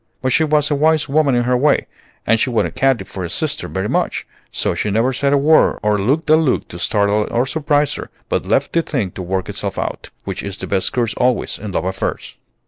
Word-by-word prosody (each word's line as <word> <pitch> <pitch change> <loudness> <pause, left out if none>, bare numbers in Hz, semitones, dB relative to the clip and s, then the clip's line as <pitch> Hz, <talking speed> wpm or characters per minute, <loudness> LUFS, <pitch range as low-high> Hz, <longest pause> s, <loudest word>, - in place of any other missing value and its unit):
But 130 - +1
she 160 - +4
was 150 -1 +2
a - - +3
wise 155 +1 +2
woman 145 -2 +2
in 120 - +2
her 125 +1 +1
way, 140 +3 +2 0.4
and 115 - +3
she 130 - +1
wanted 115 -3 0
Katy 135 -3 +1
for 95 - -7
a 85 - -4
sister 155 - -2
very 95 +2 -3
much; - - -1 0.3
so - - -1
she 105 - -2
never 115 +6 +1
said 140 +2 0
a 145 - +4
word 155 +3 +4
or 105 -1 +2
looked 140 +12 0
a - - +8
look 155 -5 +1
to 85 - -8
startle 105 +2 +1
or 120 +2 +1
surprise 145 0 +1
her, - - -7 0.2
but - - -1
left - - +1
the 170 - +3
thing 125 - -2
to 95 - -7
work 95 +1 -2
itself - - -4
out, - - -4
which - - -4
is 100 -2 -5
the - - -5
best 95 -2 +1
course 120 -3 0
always 125 -1 0
in 105 -2 -6
love 90 - -2
affairs. 95 +1 -3
125 Hz, 235 wpm, -18 LUFS, 105-150 Hz, 0.4 s, a